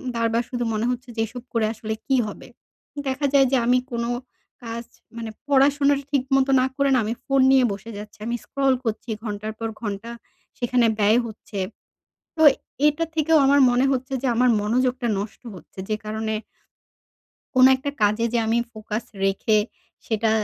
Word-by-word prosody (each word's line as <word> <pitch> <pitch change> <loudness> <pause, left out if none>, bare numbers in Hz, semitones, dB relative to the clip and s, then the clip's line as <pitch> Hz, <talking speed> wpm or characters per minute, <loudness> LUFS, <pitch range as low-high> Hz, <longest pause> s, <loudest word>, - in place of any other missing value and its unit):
বার, 230 0 +1
বার 235 +1 +2
শুধু 245 -1 -2
মনে 215 +1 -1
হচ্ছে 250 +1 -5
যে 225 - -1
এসব 245 +2 -9
করে 230 -2 +2
আসলে 220 0 -4
কি 270 - +3
হবে? 205 - -9 0.6
দেখা 265 +2 -1
যায় 270 -1 +6
যে 270 - +4
আমি 250 +1 +4
কোন 235 -1 -2 0.6
কাজ 230 +1 -5 0.3
মানে 230 -1 -5 0.2
পড়াশোনাটা 280 0 +3
ঠিক 280 -3 +2
মত 270 0 +3
না - - +3
করে 280 0 +2
না 255 - +4
আমি 220 - -1
ফোন 275 -1 +3
নিয়ে 265 -1 +5
বসে 205 +3 -9
যাচ্ছি। 210 0 -10
আমি 235 - -1
scroll 275 -1 +1
করছি 225 0 -3
ঘন্টার 215 0 -4
পর 225 0 -2
ঘন্টা 210 +1 -4 0.5
সেখানে 245 0 +2
ব্যয় 210 +3 +4
হচ্ছে। 215 -2 -8 0.8
তো - - 0 0.5
এটা 300 +3 +1
থেকেও 320 0 +3
আমার 280 +1 +5
মনে 245 +2 +3
হচ্ছে 260 +1 -2
যে - - +1
আমার 250 +2 +4
মনোযোগটা 250 +3 0
নষ্ট 205 +1 -6
হচ্ছে। 185 - -13
যে 215 - +1
কারণে 220 0 -2 1.2
কোনো 255 0 +7
একটা 275 +2 -4
কাজে 210 +2 +3
যে - - +3
আমি 225 +1 +2
ফোকাস 215 0 -5 0.2
রেখে 205 +2 +2 0.5
সেটা 220 0 +1
235 Hz, 175 wpm, -23 LUFS, 220-265 Hz, 1.2 s, কোনো